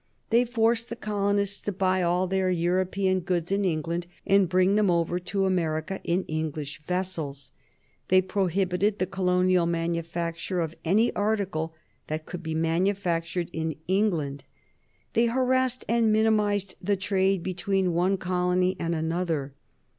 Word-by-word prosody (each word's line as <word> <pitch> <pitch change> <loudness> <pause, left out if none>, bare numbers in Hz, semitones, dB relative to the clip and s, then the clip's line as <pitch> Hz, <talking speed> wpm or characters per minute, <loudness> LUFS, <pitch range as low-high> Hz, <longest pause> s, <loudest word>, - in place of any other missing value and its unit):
They 235 +2 +4
forced 230 0 +1
the 235 - -4
colonists 200 -2 -1
to 205 - -2
buy 185 -1 +1
all 180 +1 +2
their 190 0 0
European 185 +2 +1
goods 175 -1 -2
in 200 +1 +1
England 170 0 -1 0.2
and 195 -2 +4
bring 185 +2 +3
them 210 -2 +3
over 170 0 +1
to 195 +2 -1
America 170 -1 -1
in 175 +2 0
English 155 -1 -4
vessels. 160 -7 -3 0.6
They 185 0 +5
prohibited 190 +1 0
the 185 - 0
colonial 180 -2 +2
manufacture 170 +1 -2
of 165 -2 -2
any 210 +8 +3
article 195 -7 -1 0.3
that 155 +1 -4
could 175 -1 -7
be 160 -2 -4
manufactured 170 0 0
in 160 -1 -2
England. 170 -9 0 0.7
They 235 +1 +3
harassed 255 +1 +1
and 230 -1 +3
minimized 210 -2 +2
the 200 -1 +1
trade 190 -1 +1
between 190 0 0
one 185 +3 +2
colony 180 0 +1
and 170 0 -1
another. 160 -3 -2
185 Hz, 140 wpm, -26 LUFS, 170-200 Hz, 0.7 s, They